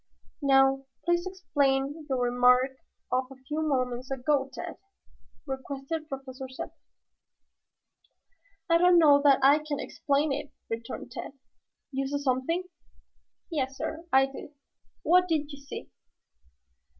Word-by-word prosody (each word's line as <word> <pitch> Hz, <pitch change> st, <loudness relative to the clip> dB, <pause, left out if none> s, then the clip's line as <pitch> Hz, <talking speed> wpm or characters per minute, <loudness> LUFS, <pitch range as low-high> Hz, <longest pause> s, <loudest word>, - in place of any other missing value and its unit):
"Now 270 Hz, -1 st, +4 dB, 0.2 s
please 345 Hz, +1 st, +1 dB
explain 290 Hz, -5 st, 0 dB
your 265 Hz, -, +1 dB
remark 250 Hz, +2 st, +4 dB, 0.4 s
of 255 Hz, +1 st, +2 dB
a 270 Hz, -, -11 dB
few 305 Hz, +1 st, -2 dB
moments 255 Hz, -4 st, -1 dB
ago, 270 Hz, +1 st, 0 dB
Tad," -, -, -7 dB, 0.7 s
requested 275 Hz, +3 st, -5 dB
Professor 265 Hz, -1 st, -6 dB
Zepplin. 260 Hz, -, -6 dB, 2.0 s
"I 335 Hz, -1 st, +4 dB
don't 355 Hz, 0 st, +6 dB
know 290 Hz, -4 st, +7 dB
that 280 Hz, -2 st, +6 dB
I 285 Hz, +3 st, +7 dB
can 300 Hz, -2 st, -4 dB
explain 285 Hz, +1 st, 0 dB
it," 290 Hz, +1 st, -5 dB, 0.2 s
returned 230 Hz, +2 st, -5 dB
Tad. 255 Hz, -, -6 dB, 0.6 s
"You 270 Hz, 0 st, -1 dB
saw 285 Hz, +1 st, -1 dB
something?" 280 Hz, +6 st, 0 dB, 0.9 s
"Yes, 270 Hz, -4 st, -2 dB
sir, 320 Hz, +1 st, -4 dB
I 265 Hz, 0 st, +6 dB
did." 275 Hz, +2 st, -10 dB, 0.5 s
"What 360 Hz, +2 st, +5 dB
did 305 Hz, -3 st, 0 dB
you 285 Hz, -, -9 dB
see?" 280 Hz, -, -8 dB
275 Hz, 125 wpm, -28 LUFS, 265-305 Hz, 2.0 s, know